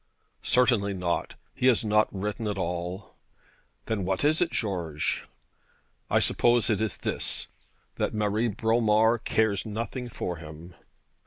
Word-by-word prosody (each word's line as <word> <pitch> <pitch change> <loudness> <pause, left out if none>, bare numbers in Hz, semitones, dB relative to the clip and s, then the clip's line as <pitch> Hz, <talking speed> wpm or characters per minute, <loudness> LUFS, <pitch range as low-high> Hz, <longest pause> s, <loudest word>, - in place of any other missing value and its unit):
'Certainly 115 -6 +2
not. 90 -2 -2 0.2
He 125 - +1
has 120 -3 +3
not 105 0 +3
written 105 +3 -3
at 105 -1 -2
all.' 90 +2 -4 0.7
'Then 110 -3 -1
what 95 +5 -1
is 155 +3 +3
it, 175 - +3
George?' 85 - -2 0.8
'I - - +4
suppose 120 -1 +3
it 105 - +1
is 110 -2 -1
this, - - -2 0.5
that - - 0
Marie 105 +2 0
Bromar 110 +1 +3
cares 110 -3 +1
nothing 115 +3 -4
for 90 -6 -4
him.' 80 +2 -11
105 Hz, 135 wpm, -27 LUFS, 95-115 Hz, 0.8 s, I